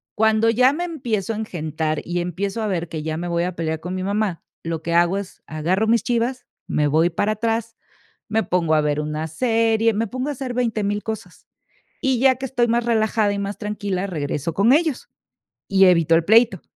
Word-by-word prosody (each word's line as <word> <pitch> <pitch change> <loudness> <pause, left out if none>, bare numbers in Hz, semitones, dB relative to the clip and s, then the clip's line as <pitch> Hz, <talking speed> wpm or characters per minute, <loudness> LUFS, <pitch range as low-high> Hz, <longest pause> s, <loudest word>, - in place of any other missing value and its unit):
cuando 220 +1 +3
ya 250 +4 +4
me 340 +4 -3
empiezo 230 - -2
a - - -5
engentar, 160 -6 -3
y 175 +1 -2
empiezo 195 +5 -3
a 215 - -1
ver 175 -4 -2
que 155 -2 -5
ya 155 0 -3
me 175 +2 -4
voy 170 0 0
a 180 0 -3
pelear 160 -1 -2
con 180 +3 -6
mi 185 - -3
mamá, 200 -2 -1 0.2
lo 165 -1 -3
que 170 - -2
hago 175 +3 +3
es 200 -1 -7
agarro 175 +7 0
mis 230 +1 +3
chivas, 245 +1 -1 0.2
me 150 - +1
voy 160 +4 +3
para 205 +5 0
atrás, 225 +1 -2 0.5
me 220 +1 +1
pongo 170 -5 +1
a 155 - +4
ver 150 0 0
una 150 +1 -3
serie, 225 - +2
me 225 +3 0
pongo 255 +5 -3
a - - -1
hacer 260 -2 -5
veinte 230 -3 0
mil 205 +1 -1
cosas, 220 -1 -7 0.6
y 265 -3 +1
ya 260 +1 +5
que 260 +2 -6
estoy 245 -2 +1
más 235 +1 +1
relajada 220 -2 +1
y 200 - -3
más 200 0 -4
tranquila, 205 -3 -3
regreso 150 -2 -3
con 200 +8 +3
ellos, 310 -3 0 0.6
y 195 -1 +5
evito 165 -3 +4
el 165 - +3
pleito. 220 -2 +4
205 Hz, 210 wpm, -22 LUFS, 170-230 Hz, 0.6 s, ya